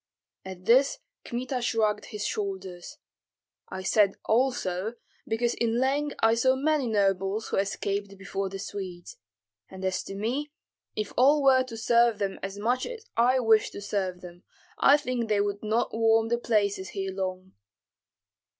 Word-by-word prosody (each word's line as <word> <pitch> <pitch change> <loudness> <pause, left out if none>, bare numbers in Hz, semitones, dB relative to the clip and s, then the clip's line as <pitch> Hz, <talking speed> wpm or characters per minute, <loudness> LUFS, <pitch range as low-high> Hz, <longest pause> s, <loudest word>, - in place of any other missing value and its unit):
At 185 -1 -9
this 260 +5 +4 0.3
Kmita 250 +1 -3
shrugged 220 -3 0
his 210 -2 -5
shoulders. 190 -3 -5 0.7
"I 190 0 -6
said 200 0 +3
also, 220 -4 0 0.3
because 235 +2 0
in 230 -1 0
Leng 275 +4 +1
I 225 0 +5
saw 260 +3 +3
many 290 -1 +1
nobles 195 0 0
who - - -1
escaped 200 0 -2
before 195 0 -4
the 195 - -6
Swedes; 190 -3 -7 0.5
and 190 0 -7
as 185 0 0
to 195 - -7
me, 255 +9 -2 0.4
if 215 -1 -3
all 280 +3 +5
were 265 -1 +6
to 230 -3 -8
serve 235 0 +3
them 200 -2 -3
as 195 +1 -5
much 240 +5 0
as 470 -2 -8
I 245 +3 +4
wish 220 -2 +4
to - - -8
serve 190 -3 -3
them, 175 0 -11 0.4
I 280 - +6
think 250 -5 -3
they 210 -1 +2
would 205 0 -1
not 220 +2 0
warm 225 0 +3
the 235 0 +1
places 200 -5 0
here 195 +1 -4
long." 185 0 -4
215 Hz, 160 wpm, -27 LUFS, 195-240 Hz, 0.7 s, were